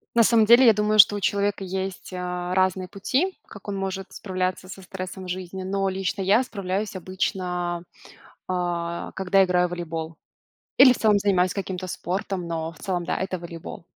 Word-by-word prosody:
На 230 - +6
самом 225 -1 +5
деле, 240 +3 +7
я 225 - +8
думаю, 210 +1 +1
что 205 - +8
у - - -2
человека 200 0 0
есть, 190 0 -5
а, 180 0 -3
разные 185 -1 +1
пути, 270 - -1
как 205 0 -11
он 200 - -3
может 195 0 -4
справляться 185 -1 -3
со 190 +1 -9
стрессом 185 0 -7
в 180 - -8
жизни, 185 +1 -5
но 195 +1 -1
лично 190 +1 -2
я 205 +7 +4
справляюсь 200 -2 -3
обычно, 180 -1 -2 0.6
а, 175 -2 -2
когда 190 0 +3
играю 180 -1 +2
в - - -12
волейбол 165 -2 -5 0.6
или 260 -2 +9
в - - -5
целом 210 -2 +4
занимаюсь 185 -3 +2
каким-то 185 -2 -4
спортом, 185 0 -3
но 165 -1 -3
в 160 - -18
целом, 180 -1 -2
да, - - -1
это 190 -1 -3
волейбол. 170 -1 -9
185 Hz, 180 wpm, -24 LUFS, 180-200 Hz, 0.6 s, или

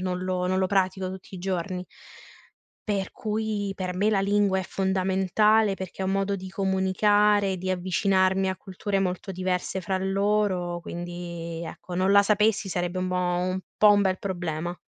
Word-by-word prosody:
non 185 -1 -2
lo 180 -1 -1
non 185 - +1
lo 190 - +2
pratico 190 -1 0
tutti 190 +1 -9
i - - -8
giorni. 180 0 -3 1.0
Per 195 -2 -1
cui 215 -2 -2
per 185 -1 -3
me 205 +4 +2
la 200 -2 +2
lingua 200 -1 +2
è - - -1
fondamentale 195 +3 +2
perché 190 0 -6
è - - -1
un 190 - 0
modo 195 0 0
di 190 -1 -6
comunicare, 195 +1 +2
di 185 +1 -3
avvicinarmi 190 +1 +2
a 185 - -2
culture 195 +1 -3
molto 185 0 -2
diverse 185 0 -2
fra 190 +2 -1
loro, 195 -2 0
quindi, 170 -1 -6
ecco, 175 +2 -8
non 185 +2 +2
la 200 0 +7
sapessi 210 +1 +2
sarebbe 175 0 -2
un 185 - -1
bo 185 - -1
un 180 +1 0 0.2
po' 210 -1 +7
un 205 - +4
bel 190 -1 +1
problema. 175 -2 -3
190 Hz, 175 wpm, -26 LUFS, 180-200 Hz, 1.0 s, la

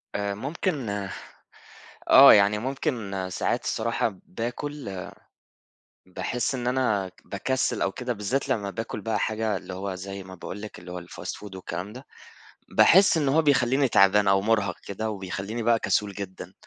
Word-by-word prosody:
آآ، 100 0 -1
ممكن 140 - -2 1.2
آه، 140 +1 +10
يعني 100 0 +5
ممكن 115 - -3
ساعات - - -1
الصراحة 110 -3 -1
باكُل، 120 - -5 1.0
باحِس 120 +8 -2
إن 120 -1 -3
أنا 115 -7 +1
ك 95 - -25
باكسل 125 +2 -1
أو 95 - +1
كده، 125 +4 -3
بالذات 115 +7 -2
لمّا 105 -6 0
باكُل 110 +1 -5
بقى 110 0 -1
حاجة، 110 -1 -1
اللي 95 0 -8
هو 95 +1 -4
زي 95 +1 -7
ما 95 0 -10
باقول 95 +3 -7
لِك، 110 - -8
اللي 90 +1 -10
هو 90 0 -5
الfast 85 - -7
food 100 -2 -10
والكلام 95 +2 -6
ده، 130 +3 -11 0.6
باحِس 190 -1 +6
إنه 145 -2 +1
هو - - +6
بيخلِّيني 135 -2 +3
تعبان 100 -2 +4
أو 95 0 +4
مُرهَق 100 -4 +1
كده، 110 +3 -3
وبيخلِّيني 100 +3 -4
بقى 115 0 +3
كسول 105 -2 0
جدًا. 95 -2 -8
105 Hz, 160 wpm, -26 LUFS, 95-125 Hz, 1.2 s, آه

